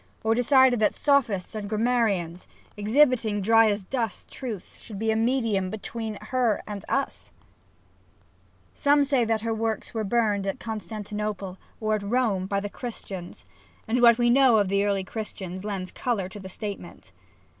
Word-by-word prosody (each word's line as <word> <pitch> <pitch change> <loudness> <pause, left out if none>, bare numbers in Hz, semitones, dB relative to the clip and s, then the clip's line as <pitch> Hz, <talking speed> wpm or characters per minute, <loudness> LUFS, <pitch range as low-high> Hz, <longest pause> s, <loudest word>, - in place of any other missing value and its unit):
or 220 0 +3
decided 250 0 +4
that 215 - +2
Sophists 240 -11 +1
and 210 -2 -5
Grammarians, 215 -7 0 0.3
exhibiting 225 -1 +3
dry 225 +2 +5
as 205 -1 -1
dust 225 -1 -4
truths, 225 -9 -6
should 210 - -8
be 220 +2 0
a - - +1
medium 225 -5 +1
between 220 +1 -5
her 245 -5 0
and 205 -2 -6
us? 275 0 -2 1.4
Some 290 0 +3
say 270 -4 +2
that 220 -1 0
her 225 0 -1
works 220 +1 -2
were 220 -1 -1
burned 210 -2 +1
at 195 - -2
Constantinople, 210 -3 -5 0.2
or 215 -1 0
at 215 - 0
Rome, 200 -3 0
by 200 0 0
the 205 - -4
Christians, 200 - -8 0.4
and 240 +3 +1
what 235 -1 +7
we 240 -1 +3
know 260 -3 +6
of 200 -3 +2
the 200 +1 +2
early 200 -1 +1
SAPPHO - - -16
Christians 190 -4 -6
lends 195 -3 -4
colour 220 -7 -2
to 205 - -9
the 190 -1 -9
statement. 190 - -7
215 Hz, 165 wpm, -26 LUFS, 200-235 Hz, 1.4 s, what